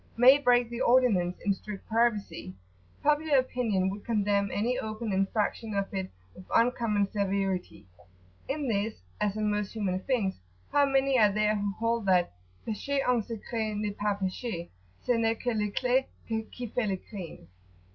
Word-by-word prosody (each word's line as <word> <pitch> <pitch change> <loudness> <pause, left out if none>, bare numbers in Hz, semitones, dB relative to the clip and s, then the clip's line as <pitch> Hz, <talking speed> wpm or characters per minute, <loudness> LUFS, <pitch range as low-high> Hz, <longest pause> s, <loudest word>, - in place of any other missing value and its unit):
may 250 +3 +8
break 245 -3 +4
the 235 - -4
ordinance 215 -8 +3
in 200 - +3
strict 200 0 -9
privacy, 220 - 0 0.5
popular 300 0 +3
opinion 230 -7 +1
would 200 +2 -4
condemn 205 -3 +1
any 235 +5 0
open 215 0 -4
infraction 205 +2 0
of 200 0 +1
it 190 -1 -2 0.2
with 185 - -12
uncommon 230 -4 +2
severity. 195 - -1 0.6
In 285 0 -1
this, 215 -1 0 0.2
as 210 0 0
in 215 -1 +1
most 210 -1 -2
human 195 -4 -1
things, 210 -4 -1 0.3
how 285 -1 +4
many 270 -1 +3
are 210 -2 +6
there 215 +1 +2
who 200 -1 -1
hold 230 -1 -1
that 180 - +3 0.3
"Pecher 275 +6 -1
en 250 -2 +3
secret 220 0 -4
n'est 210 -1 -2
pas 205 -1 0
pecher, 190 -1 -3 0.3
Ce - - -15
n'est 230 -2 +3
que 245 -1 -1
l'eclat 245 +5 +1 0.2
qui 225 +2 -4
fait 230 0 -1
le 190 -1 0
crime"? 180 - -9
215 Hz, 155 wpm, -29 LUFS, 200-245 Hz, 0.6 s, may